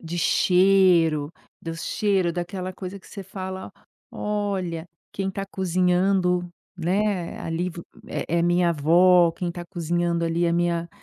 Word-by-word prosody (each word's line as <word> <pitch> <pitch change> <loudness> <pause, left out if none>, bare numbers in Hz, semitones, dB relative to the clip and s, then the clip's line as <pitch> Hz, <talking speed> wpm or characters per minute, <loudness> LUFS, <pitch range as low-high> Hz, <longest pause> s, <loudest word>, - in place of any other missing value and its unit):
de 170 +1 -6
cheiro, 180 -4 +3 0.3
do 165 0 -5
cheiro 190 0 0
daquela 180 +1 -4
coisa 190 +1 -7
que - - -20
você 200 - -8
fala: 190 0 -7 0.4
"Olha, 190 -5 -3 0.2
quem 195 -1 -2
tá 195 +1 -4
cozinhando, 180 -1 +1 0.3
né, 185 +1 -1
ali 165 +2 -2
vo 170 0 -9 0.2
é 170 +1 -2
minha 175 0 +3
avó" 170 +3 +5
"Quem 175 0 -3
tá 175 0 -7
cozinhando 170 -1 -1
ali 165 +1 0
é 170 - +2
minha 170 0 0
175 Hz, 135 wpm, -24 LUFS, 170-190 Hz, 0.4 s, avó